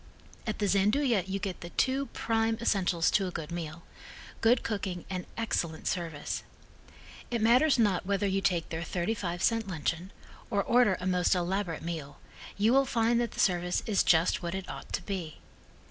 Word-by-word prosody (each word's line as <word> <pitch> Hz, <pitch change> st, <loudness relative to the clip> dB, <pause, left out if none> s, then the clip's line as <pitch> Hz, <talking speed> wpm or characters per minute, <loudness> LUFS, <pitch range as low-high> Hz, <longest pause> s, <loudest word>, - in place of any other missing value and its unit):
At 215 Hz, -, -1 dB
the 210 Hz, -, 0 dB
Gianduja 210 Hz, +2 st, +2 dB
you 195 Hz, +1 st, -2 dB
get 195 Hz, -2 st, -4 dB
the 170 Hz, -, -7 dB
two 270 Hz, +7 st, 0 dB
prime 225 Hz, 0 st, 0 dB
essentials 185 Hz, -7 st, +2 dB
to 195 Hz, -2 st, +2 dB
a -, -, -4 dB
good 160 Hz, -1 st, -6 dB
meal 170 Hz, -1 st, -5 dB, 0.6 s
good 235 Hz, +2 st, +4 dB
cooking 190 Hz, -5 st, -3 dB
and 185 Hz, -1 st, -4 dB
excellent 170 Hz, -8 st, -2 dB
service. 165 Hz, -5 st, -2 dB, 0.9 s
It 235 Hz, -, -1 dB
matters 250 Hz, +7 st, +5 dB
not 205 Hz, -6 st, +2 dB
whether 200 Hz, +1 st, 0 dB
you 195 Hz, 0 st, +1 dB
take 175 Hz, -4 st, 0 dB
their 160 Hz, 0 st, -3 dB
thirty 175 Hz, +4 st, -1 dB
five 175 Hz, -4 st, -3 dB
cent 225 Hz, -2 st, +2 dB
luncheon 175 Hz, +1 st, -3 dB, 0.4 s
or 200 Hz, -4 st, +1 dB
order 235 Hz, -6 st, +4 dB
a 180 Hz, -, -5 dB
most 180 Hz, 0 st, +2 dB
elaborate 180 Hz, -1 st, -1 dB
meal, 160 Hz, -4 st, -5 dB, 0.4 s
you 215 Hz, +4 st, +3 dB
will 270 Hz, 0 st, +4 dB
find 235 Hz, -1 st, +2 dB
that 235 Hz, -, -2 dB
the -, -, -8 dB
service 180 Hz, -1 st, +1 dB
is 210 Hz, -3 st, +2 dB
just 165 Hz, 0 st, +3 dB
what 170 Hz, +1 st, -3 dB
it 190 Hz, -1 st, -5 dB
ought -, -, -8 dB
to -, -, -1 dB
be. 180 Hz, -6 st, -4 dB
190 Hz, 180 wpm, -30 LUFS, 175-225 Hz, 0.9 s, matters